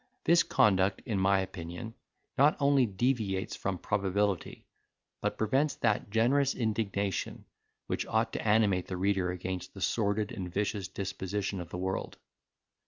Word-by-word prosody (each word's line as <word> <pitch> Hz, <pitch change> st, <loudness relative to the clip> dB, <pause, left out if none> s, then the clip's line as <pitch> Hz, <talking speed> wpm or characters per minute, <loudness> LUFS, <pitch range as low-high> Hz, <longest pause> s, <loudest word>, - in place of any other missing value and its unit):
This 170 Hz, +1 st, +6 dB
conduct, 95 Hz, -1 st, +2 dB
in 105 Hz, -4 st, -1 dB
my 95 Hz, 0 st, +3 dB
opinion, 95 Hz, +4 st, -6 dB, 0.4 s
not 145 Hz, +3 st, +4 dB
only 140 Hz, -3 st, +4 dB
deviates 100 Hz, -2 st, -1 dB
from 95 Hz, -2 st, -2 dB
probability, 100 Hz, -1 st, -1 dB, 0.6 s
but -, -, -1 dB
prevents 135 Hz, +7 st, +1 dB
that 110 Hz, -3 st, 0 dB
generous 130 Hz, +6 st, +2 dB
indignation, 105 Hz, -4 st, -2 dB, 0.4 s
which -, -, -2 dB
ought -, -, 0 dB
to -, -, -2 dB
animate 105 Hz, -4 st, +2 dB
the 90 Hz, -, -4 dB
reader 95 Hz, -1 st, +1 dB
against 90 Hz, +1 st, -5 dB
the 95 Hz, -, -9 dB
sordid 105 Hz, 0 st, 0 dB
and 90 Hz, -2 st, -5 dB
vicious 100 Hz, 0 st, -1 dB
disposition 95 Hz, 0 st, -3 dB
of 85 Hz, -, -8 dB
the 90 Hz, -, -5 dB
world. 95 Hz, +1 st, -3 dB
100 Hz, 140 wpm, -30 LUFS, 95-110 Hz, 0.6 s, This